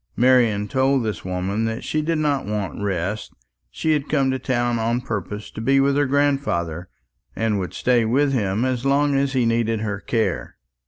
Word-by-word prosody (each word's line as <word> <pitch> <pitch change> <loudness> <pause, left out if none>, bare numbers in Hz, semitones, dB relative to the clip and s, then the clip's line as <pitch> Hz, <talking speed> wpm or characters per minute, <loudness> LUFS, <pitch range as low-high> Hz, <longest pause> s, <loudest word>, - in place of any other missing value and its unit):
Marian 120 -5 +3
told 135 0 +2
this 105 -6 -3
woman 95 +4 -2
that 115 0 -3
she 155 - -1
did 165 +1 0
not 145 -6 0
want 105 -2 -3
rest. 100 +1 -2 0.4
She 160 - -1
had 150 -1 -1
come 135 -3 +2
to 130 - -2
town 120 -2 0
on 115 +2 0
purpose 105 -2 -5
to - - -7
be 135 +4 +3
with 140 0 +3
her 145 -1 +2
grandfather, 130 - 0 0.5
and 110 -2 0
would 90 - -5
stay 125 -2 +2
with 135 +5 +2
him 105 -1 0
as 130 -2 -1
long 140 +1 +2
as 140 0 +1
he 125 -3 +2
needed 115 -1 +1
her 105 -2 -3
care. 115 -2 -1
120 Hz, 190 wpm, -22 LUFS, 105-135 Hz, 0.5 s, Marian